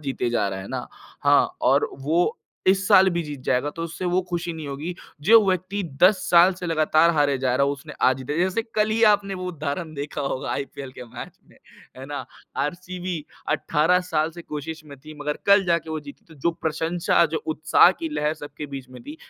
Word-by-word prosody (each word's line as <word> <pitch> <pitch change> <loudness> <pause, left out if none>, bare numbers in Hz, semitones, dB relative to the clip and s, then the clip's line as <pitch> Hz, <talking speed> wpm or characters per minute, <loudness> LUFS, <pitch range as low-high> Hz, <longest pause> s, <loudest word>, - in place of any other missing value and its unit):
जीते 135 -4 -2
जा 110 -4 +1
रहा 95 0 -5
है 95 - -9
ना, - - -4 0.4
हाँ, - - +4
और - - +3
वो 160 +6 +1 0.3
इस 195 +1 +3
साल 190 -2 +7
भी 170 0 -1
जीत 145 -3 -7
जाएगा, 130 +3 +1
तो 165 - -7
उसे 170 +2 -6
वो 180 +1 +2
खुशी 175 -1 -3
नहीं 160 -2 -7
होगी। 150 +6 -5 0.3
जो 230 0 +10
व्यक्ति 185 +2 -1 0.2
10 190 +3 +7
साल 175 +2 +7
से 180 0 -6
लगातार 160 0 +3
हारे 145 -2 +2
जा 130 -1 0
रहा 140 - +3
है, 140 - +1
उसने 150 +2 -9 0.2
आज 130 - +1
जीता 130 +3 -4
जैसे 185 +5 +1
कल 215 0 +2
ही 225 +1 +1
आपने 200 -1 -1
वो 185 -1 -5
उदाहरण 155 0 -4
देखा 145 +1 -5
होगा 135 -2 -3
आईपीएल 140 -1 -5
के 125 - -7
मैच 115 - -9 0.2
में। - - -21 0.4
है 130 - -8
ना? 145 -2 -5 0.3
आरसीबी 175 +5 -3 0.4
18 165 +4 +2
साल 155 +1 +1
से 170 +1 -10
कोशिश 155 +1 -6
में 145 -2 -11
थी, 155 +2 -11
मगर 150 0 -3
कल 200 -1 +6
जाके 170 -2 0
वो 160 - -2
जीती। 145 -1 -13
तो 160 - -15
जो 155 +4 0
प्रशंसा, 165 +2 +1
जो 160 0 -4
उत्साह 160 +2 +5
की 165 - -3
लहर 150 +1 0
सबके 150 -1 -8
बीच 130 -1 -9
में 125 - -12
थी, 295 +5 -9
160 Hz, 215 wpm, -24 LUFS, 145-180 Hz, 0.4 s, जो